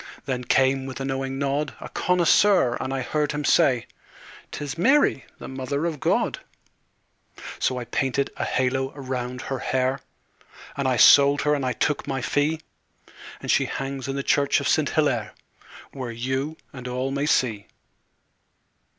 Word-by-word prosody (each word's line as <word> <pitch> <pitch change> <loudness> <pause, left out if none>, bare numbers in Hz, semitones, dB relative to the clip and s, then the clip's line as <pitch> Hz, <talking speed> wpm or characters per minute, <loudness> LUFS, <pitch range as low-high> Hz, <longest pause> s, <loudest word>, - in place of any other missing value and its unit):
Then 125 -2 -2
came, 135 +1 +2
with 130 - -7
a 135 - -3
knowing 135 0 -3
nod, 140 +2 -1
A - - -7
connoisseur, 180 -5 +3
and 130 - -3
I 135 -1 -2
heard 150 +3 -1
him 150 0 -3
say; 130 -9 +3 0.7
"'Tis 145 -2 -5
Mary, 260 - +3
the - - -9
Mother 135 +3 -3
of 160 -4 -3
God." - - 0 1.2
So 130 - 0
I 125 - -4
painted 135 +3 -1
a - - -3
halo 130 +1 0
round 125 -2 -5
her 135 -1 -4
hair, 130 +1 0 0.8
And 140 -1 -1
I 130 -2 +1
sold 140 +3 +7
her 150 - +2
and 130 -5 -2
took 150 -2 0
my 135 -1 -2
fee, 155 +2 0 0.8
And - - -1
she - - +3
hangs 135 -1 -4
in 135 - -3
the 140 - -2
church 140 0 +2
of - - -2
Saint - - +2
Hillaire, - - 0 0.6
Where 130 -3 -6
you 130 +6 -3 0.2
and 125 -2 -8
all 130 +2 -2
may 140 +2 -1
see. 110 -9 +1
135 Hz, 160 wpm, -24 LUFS, 130-145 Hz, 1.2 s, sold